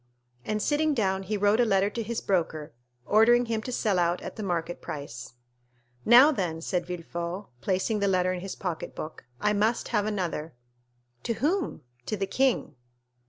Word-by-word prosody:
And, 215 Hz, +5 st, -2 dB
sitting 300 Hz, 0 st, +2 dB
down, 190 Hz, -4 st, +1 dB
he 205 Hz, +3 st, -2 dB
wrote 205 Hz, +2 st, +3 dB
a -, -, +6 dB
letter 200 Hz, -2 st, +2 dB
to 235 Hz, -, -3 dB
his 225 Hz, +1 st, -3 dB
broker, 160 Hz, -5 st, -1 dB, 0.3 s
ordering 240 Hz, -, +5 dB
him 225 Hz, -1 st, -1 dB
to 250 Hz, -, -6 dB
sell 210 Hz, -6 st, +1 dB
out 175 Hz, +1 st, +1 dB
at -, -, -6 dB
the 220 Hz, -, -6 dB
market 175 Hz, -3 st, -2 dB
price. 140 Hz, -7 st, -7 dB, 0.7 s
"Now, 250 Hz, +6 st, +8 dB
then," 175 Hz, -, -2 dB
said 175 Hz, +1 st, -2 dB
Villefort, 175 Hz, +2 st, -5 dB
placing 195 Hz, +3 st, 0 dB
the 200 Hz, -, +1 dB
letter 185 Hz, -1 st, +2 dB
in 180 Hz, -, -4 dB
his 190 Hz, +1 st, -6 dB
pocketbook, 160 Hz, -4 st, -5 dB
"I 210 Hz, -, +2 dB
must 215 Hz, +3 st, +1 dB
have 210 Hz, -3 st, +1 dB
another!" 175 Hz, -7 st, -3 dB, 0.7 s
"To 230 Hz, -, -1 dB
whom?" 340 Hz, -, -1 dB, 0.3 s
"To 215 Hz, -, -1 dB
the 195 Hz, -, 0 dB
king." 255 Hz, -, +1 dB
195 Hz, 170 wpm, -27 LUFS, 175-225 Hz, 0.7 s, Now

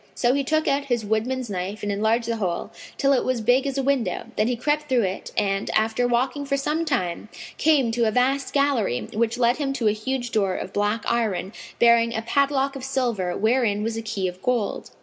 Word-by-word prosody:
So 240 Hz, +1 st, +2 dB
he 280 Hz, 0 st, +1 dB
took 310 Hz, +3 st, 0 dB
out 280 Hz, +1 st, +1 dB
his 240 Hz, -5 st, -1 dB
woodman's 235 Hz, +4 st, -1 dB
knife 200 Hz, +2 st, -4 dB
and 205 Hz, -, -1 dB
enlarged 220 Hz, +3 st, +1 dB
the 230 Hz, -1 st, -1 dB
hole, 180 Hz, -5 st, -2 dB, 0.3 s
till 275 Hz, -1 st, +3 dB
it 260 Hz, -, +2 dB
was 255 Hz, -2 st, 0 dB
big 245 Hz, +5 st, +2 dB
as 275 Hz, 0 st, -3 dB
a 270 Hz, -, 0 dB
window, 270 Hz, -3 st, -1 dB
then 215 Hz, -, +1 dB
he 245 Hz, -, 0 dB
crept 295 Hz, +4 st, -1 dB
through 250 Hz, -3 st, +3 dB
it 190 Hz, 0 st, -4 dB
and, 195 Hz, -1 st, 0 dB
after 225 Hz, +3 st, +2 dB
walking 255 Hz, +4 st, 0 dB
for 275 Hz, 0 st, -1 dB
some 300 Hz, +4 st, -1 dB
time, 215 Hz, -, -2 dB, 0.3 s
came 285 Hz, -7 st, +3 dB
to 230 Hz, 0 st, +1 dB
a -, -, +1 dB
vast 265 Hz, +4 st, +1 dB
gallery, 275 Hz, -, +1 dB
which 230 Hz, +1 st, 0 dB
led 240 Hz, 0 st, +3 dB
him 280 Hz, -3 st, -1 dB
to 235 Hz, -5 st, 0 dB
a -, -, +5 dB
huge 240 Hz, +3 st, -3 dB
door 195 Hz, -4 st, +1 dB
of 190 Hz, -, -6 dB
black 205 Hz, +2 st, 0 dB
iron 210 Hz, -4 st, -1 dB, 0.2 s
bearing 235 Hz, 0 st, +4 dB
a 220 Hz, -, -2 dB
padlock 275 Hz, +3 st, +1 dB
of 270 Hz, -, -7 dB
silver 240 Hz, -9 st, -1 dB
wherein 220 Hz, -2 st, +1 dB
was 225 Hz, 0 st, -2 dB
a 225 Hz, -, -3 dB
key 210 Hz, -4 st, -2 dB
of 180 Hz, +1 st, -7 dB
gold. 245 Hz, -4 st, -1 dB
235 Hz, 220 wpm, -24 LUFS, 215-270 Hz, 0.3 s, a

